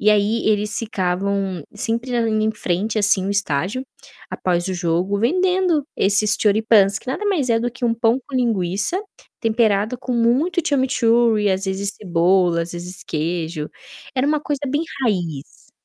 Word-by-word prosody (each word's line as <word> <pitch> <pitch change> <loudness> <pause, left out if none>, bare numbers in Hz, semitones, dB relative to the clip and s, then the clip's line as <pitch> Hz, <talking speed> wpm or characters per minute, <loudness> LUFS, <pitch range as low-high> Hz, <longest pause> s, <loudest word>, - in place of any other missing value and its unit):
E 215 - +4
aí 210 +2 +2
eles 210 0 0
ficavam 195 - -2
sempre 230 +4 -2
andando 220 -2 +1
em 220 - +2
frente 210 +2 -2
assim 205 -2 +3
o - - -1
estágio, 200 - -1 0.4
após 175 -1 -1
o 190 - -2
jogo, 175 +3 0
vendendo 360 +2 +2
esses 205 +2 +3
Choripans, 205 -2 +4
que - - -22
nada 310 +11 -3
mais 330 -12 +1
é 225 0 +3
do 240 +1 -1
que 245 +1 -6
um 230 -1 +2
pão 230 +1 +2
com 275 - -10
linguiça 210 - 0 0.4
temperado 220 0 +1
com 250 0 -5
muito 260 +10 +2
chimichurri 235 -5 +2
e 200 - +3
às 190 +1 0
vezes 195 +1 -2
cebola, 175 -2 +2
às 170 - -6
vezes 175 +1 -8
queijo. 160 -1 -3 0.4
Era 260 +1 +1
uma 300 0 +1
coisa 290 -2 -3
bem 290 +4 0 0.2
raiz. 170 - -3
210 Hz, 165 wpm, -20 LUFS, 190-245 Hz, 0.4 s, E